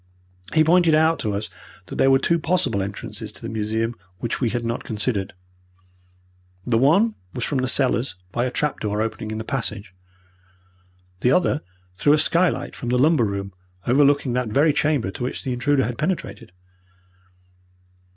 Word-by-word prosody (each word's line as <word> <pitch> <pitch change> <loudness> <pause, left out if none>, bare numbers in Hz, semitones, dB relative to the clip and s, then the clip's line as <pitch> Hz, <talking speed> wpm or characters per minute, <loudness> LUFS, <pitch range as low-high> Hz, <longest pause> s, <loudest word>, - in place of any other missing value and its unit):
He 155 - +6
pointed 165 0 +4
out 160 +1 +3
to 105 -2 -2
us 105 +1 -4 0.3
that - - -8
there 135 - +4
were 135 - +6
two 170 +5 +1
possible 155 - +1
entrances 100 +1 -6
to - - -13
the 115 - -4
museum 110 +2 -1 0.2
which 115 +6 -3
we 120 - +2
had 120 +1 -3
not 115 +1 -2
considered. 105 -2 -2 1.3
The 115 -2 +2
one 195 - +4 0.2
was 125 - -3
from 140 +1 0
the 130 - 0
cellars 125 -5 +1 0.2
by 120 - 0
a - - 0
trap 150 +3 -1
door 105 -1 -2
opening 110 0 -3
in 110 - -4
the 110 - -4
passage. 110 -6 -3 1.3
The 125 - +2
other 155 0 +2 0.4
through 145 +7 +4
a - - +5
skylight 170 +4 +1
from 120 - -5
the 125 - +2
lumber 145 -2 +4
room, 100 -1 -4 0.3
overlooking 140 0 +3
that 125 -2 -1
very 145 +7 +3
chamber 145 -10 +1
to - - -10
which 125 - -3
the 130 - -2
intruder 135 +2 +1
had 120 0 -5
penetrated. 150 - -3
125 Hz, 170 wpm, -23 LUFS, 110-150 Hz, 1.3 s, He